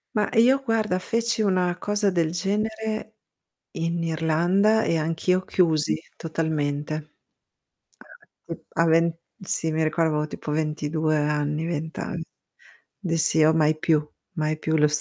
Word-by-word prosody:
Ma 210 - +2
io 255 +5 +5
guarda 220 -6 0
feci 230 +2 -1
una 185 -3 +1
cosa 205 +2 0
del 165 -3 +1
genere 215 +4 -2 0.6
in 165 +1 -2
Irlanda, 170 +7 +2
e 165 - +1
anch'io 165 +4 +1
chiusi 160 -4 +1
totalmente. 155 -1 -2 1.4
Sì - - -3
p - - -22
a 165 - +3
ven 165 0 +3 0.3
Sì, 165 -3 -1
mi 160 0 0
ricordavo 160 0 +1
avevo 150 0 -1
tipo 150 - -6
22 155 0 0
anni, 150 +1 0
20 160 0 -4
an 175 - -4 0.8
Dissi, 165 -3 +2
uhm: 160 +1 +4
"Mai 155 0 +3
più, 155 -2 +1 0.3
mai 155 -2 -1
più 160 0 0
lo" 150 - +5
165 Hz, 135 wpm, -24 LUFS, 155-190 Hz, 1.4 s, io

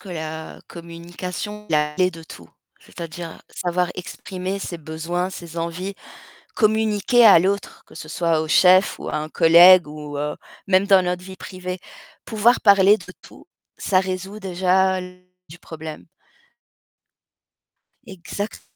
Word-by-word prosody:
que 200 - -13
la 160 -2 -7
communication, 175 +5 -8
la 150 -1 +1
clé 185 +3 +2
de 165 -2 -12
tout, 85 - -13 0.3
c'est-à-dire 165 0 -9
savoir 180 0 -2
exprimer 185 +1 -6
ses 175 -3 -6
besoins, 165 +4 -4
ses 170 -3 -10
envies, 175 +4 -4 0.6
communiquer 220 +2 +3
à 200 - +8
l'autre, 195 +3 -2
que - - -18
ce 155 - -9
soit 165 0 0
au 155 - -4
chef 185 +3 +4
ou - - -7
à - - -3
un 155 +1 -4
collègue 170 +2 +7
ou 150 -1 -8
heu, 150 +1 -3 0.3
même 190 0 +3
dans 195 -2 +5
notre 180 0 -2
vie 190 0 -10
privée. 185 0 -7 0.5
Pouvoir 225 +3 +2
parler 200 0 +6
de - - -13
tout, - - -16 0.3
ça 185 -2 +1
résout 190 +2 -5
déjà 190 0 +1
l 180 0 -10 0.3
du 165 - -13
problème. 155 - -9 2.0
Exacte 195 +4 -7
180 Hz, 140 wpm, -21 LUFS, 165-190 Hz, 2.0 s, à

